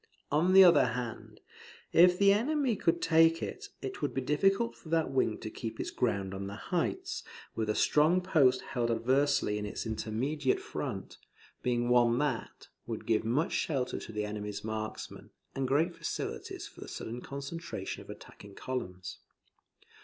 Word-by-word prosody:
On 165 +6 +3
the 190 0 +10
other 170 -5 +7
hand, 120 -3 -6 0.5
if 180 +1 +7
the 200 0 +6
enemy 260 +2 +1
could 170 -3 0
take 165 +1 +4
it, 410 +1 -6
it 390 - -5
would - - -2
be 135 - 0
difficult 195 - +2
for 160 - -14
that 160 -3 +1
wing 130 -5 +1
to 110 - -5
keep 110 0 -6
its - - -3
ground 100 -5 -1
on 100 0 -5
the 100 - -6
heights, - - -2 0.3
with 110 -1 -2
a 105 - +1
strong 155 +5 +4
post 145 -9 +3
held 120 -2 -2
adversely 120 -1 +2
in 105 - -4
its 105 - -5
immediate 125 +6 -1
front, - - -6 0.4
being 120 -1 0
one 120 -1 +4
that; 140 -4 -2 0.2
would - - -5
give 110 -1 +2
much 125 +8 0
shelter 135 -5 -1
to - - -9
the 105 -1 -2
enemy's 105 -1 -5
marksmen, 110 0 -5 0.2
and 135 -1 -1
great 160 +6 +2
facilities - - -5
for - - -15
the - - -8
sudden 120 +2 -6
concentration 140 - -6
of - - -15
attacking 100 -1 -11
columns. 90 -9 -5
130 Hz, 165 wpm, -31 LUFS, 110-165 Hz, 0.5 s, the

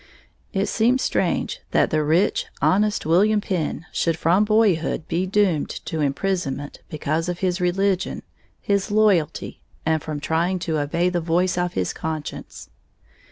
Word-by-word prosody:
It 195 +1 0
seems 235 +5 +2
strange - - 0
that - - +2
the 155 -1 +2
rich, 160 +6 +2
honest 210 +2 +2
William 205 +7 +4
Penn 175 -4 -3
should 165 -1 0
from 180 +6 +3
boyhood 210 -8 +2
be 180 +3 -1
doomed 190 -6 +1 0.2
to 160 - -3
imprisonment 145 -1 -2
because 155 +3 -2
of 175 -1 -4
his 180 0 0
religion, 190 +1 0 0.4
his 200 -1 0
loyalty, 205 -7 +1 0.2
and 160 -1 +1
from 155 -1 -5
trying 165 +5 0
to 160 -3 -2
obey 170 +5 +1
the 175 -1 -1
voice 175 +2 +1
of 175 0 -1
his 90 - -1
conscience. 155 -2 -6
175 Hz, 145 wpm, -23 LUFS, 160-195 Hz, 0.4 s, William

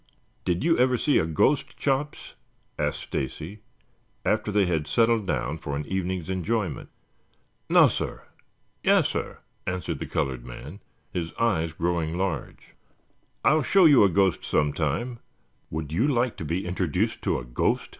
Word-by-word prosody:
"Did 90 +4 0
you 165 -2 +3
ever 125 0 +4
see 145 +3 +3
a 80 - 0
ghost, 125 - +1
Chops?" 145 +2 -2 0.5
asked - - -1
Stacy 80 +9 -5 0.7
after 110 -1 +1
they 100 -1 +3
had 80 -4 -1
settled 115 -3 +2
down 75 0 -1
for 70 -2 -4
an 75 +1 -3
evening's 95 -1 -2
enjoyment. 95 0 -2 0.8
"Nassir. - - +3 0.6
Yassir," - - +1 0.3
answered 90 -1 -2
the - - -4
colored 65 -3 -2
man, 70 +9 -9 0.3
his 85 -2 -3
eyes 85 -9 +1
growing 85 -1 -1
large. 90 -8 -4 0.7
"I'll 155 +2 +5
show 185 +7 +5
you 145 -8 +7
a 100 - +5
ghost 95 0 +2
some 75 -1 +1
time. 115 - -2 0.5
Would 75 -1 -4
you 110 - +2
like 125 -4 +1
to 80 - -5
be 85 +5 -2
introduced 90 -3 -1
to - - 0
a - - -6
ghost?" - - 0
90 Hz, 145 wpm, -26 LUFS, 80-115 Hz, 0.8 s, you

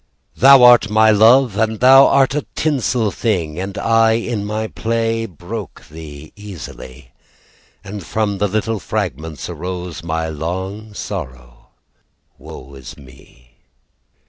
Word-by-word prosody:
Thou 135 -1 +7
are 120 -1 +8
my 110 +1 +4
love, 115 +2 +4
And 110 0 -1
thou 135 +2 +7
art 135 -1 +2
a 150 - -3
tinsel 125 -7 0
thing, 90 -9 -2
And 95 +2 -6
I 115 0 +2
in 115 -2 -3
my 110 +1 -3
play 115 0 -2
Broke 95 +4 -9
thee 75 -1 -11
easily, 85 -11 -11 0.7
And 100 0 -8
from 100 +1 -2
the 105 - +1
little 110 +2 -2
fragments 80 - -5
Arose 90 0 -6
my 80 -1 -3
long 95 +7 -6
sorrow - - -8 0.7
Woe 65 +2 -12
is 65 -2 -11
me. 65 -3 -19
105 Hz, 125 wpm, -18 LUFS, 80-115 Hz, 0.7 s, are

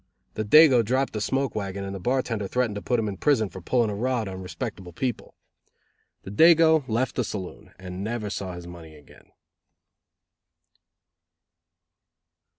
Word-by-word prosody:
The 110 - -3
dago 130 +1 +6
dropped 130 +5 0
the 105 - -3
smoke 135 +5 -1
wagon 100 -2 -4
and 95 0 -5
the 95 - -6
bartender 115 -1 -1
threatened 125 0 0
to 105 - -5
put 120 +2 0
him 110 - -1
in 100 -2 -5
prison 120 -9 +2
for 95 - -10
pulling 115 +4 +1
a - - -4
rod 120 0 -1
on 95 -1 -7
respectable 90 -1 -7
people. 125 +5 -4 0.9
The 95 - -8
dago 160 +4 +5
left 120 +3 -1
the 125 - +2
saloon 95 -4 -7
and 95 0 -7
never 110 -1 -3
saw 95 -2 -5
his 85 0 -9
money 85 -3 -11
again. 75 -2 -19
110 Hz, 155 wpm, -25 LUFS, 95-125 Hz, 0.9 s, dago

